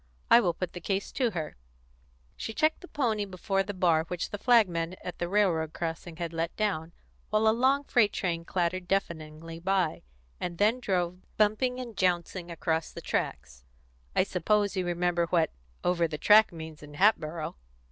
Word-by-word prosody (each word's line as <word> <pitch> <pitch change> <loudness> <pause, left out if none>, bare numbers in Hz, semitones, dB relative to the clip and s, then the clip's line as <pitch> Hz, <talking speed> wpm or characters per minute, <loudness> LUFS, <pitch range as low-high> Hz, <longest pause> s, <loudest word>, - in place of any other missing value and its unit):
I - - +10
will 180 -7 +1
put 185 -2 -4
the 175 - -7
case 195 0 -2
to 250 -3 +1
her." 160 - -5 0.8
She 220 - -6
checked 310 0 +2
the 360 - -10
pony 230 -10 0
before 195 0 -1
the 195 +1 -3
bar 165 -3 +3
which 175 +1 -4
the 205 - -4
flagman 185 -8 +3
at 180 - -6
the 175 - -2
railroad 175 -6 +2
crossing 165 0 -4
had 170 -1 -4
let 165 +1 -2
down, 175 -7 -1 0.4
while 215 +1 +2
a 220 - +6
long 265 +4 +3
freight 230 -7 +3
train 170 -4 -2
clattered 180 +1 -1
deafeningly 165 -3 -3
by, 185 -2 0 0.4
and 170 -1 -4
then 215 +6 +3
drove 180 -5 -1 0.2
bumping 220 +4 +2
and 240 -3 -7
jouncing 180 -1 0
across 160 -1 -1
the - - -8
tracks. 60 -1 -3 0.5
"I - - +5
suppose 205 +3 +1
you 185 -2 -1
remember 175 0 +1
what 165 -2 +2 0.3
'Over 170 -1 +2
the 155 -1 -5
Track' 215 +6 +6
means 160 -2 -9
in 150 0 -11
Hatboro'?" 160 -4 +1
180 Hz, 175 wpm, -29 LUFS, 165-210 Hz, 0.8 s, I